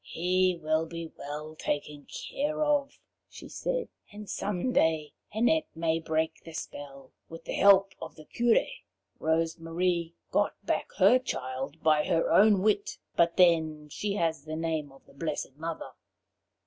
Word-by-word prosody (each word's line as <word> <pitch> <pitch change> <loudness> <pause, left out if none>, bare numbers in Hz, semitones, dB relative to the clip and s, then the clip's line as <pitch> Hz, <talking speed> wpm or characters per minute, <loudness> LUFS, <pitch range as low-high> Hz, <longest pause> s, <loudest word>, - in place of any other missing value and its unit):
"He 180 +1 +1
will 155 0 0
be 165 -1 -7
well 150 +2 -6
taken 145 -1 -4
care 300 +2 -2
of," 290 -2 0 0.3
she - - -11
said, - - -2 0.2
"and 210 0 -9
someday 175 -6 0 0.2
Annette 245 +9 +2
may 165 0 0
break 160 0 -2
the 165 - -10
spell, 140 -2 -8 0.2
with 165 0 -10
the - - -4
help 195 -1 +6
of - - -7
the 155 - -13
Curé. 235 +5 +2 0.5
Rose 165 +1 0
Marie 170 0 -1 0.2
got - - +1
back - - -1
her 205 +6 +6
child 135 - -5
by 155 -1 +4
her 165 -1 +1
own 200 -2 +6
wit, 205 -1 +1 0.2
but 170 0 +3
then 160 -4 +3
she 205 +5 -2
has 160 -6 0
the 155 0 -5
name 160 -3 -2
of 135 - -19
the - - -19
blessed 145 -2 -4
Mother. 160 +2 -5
165 Hz, 150 wpm, -29 LUFS, 155-195 Hz, 0.5 s, help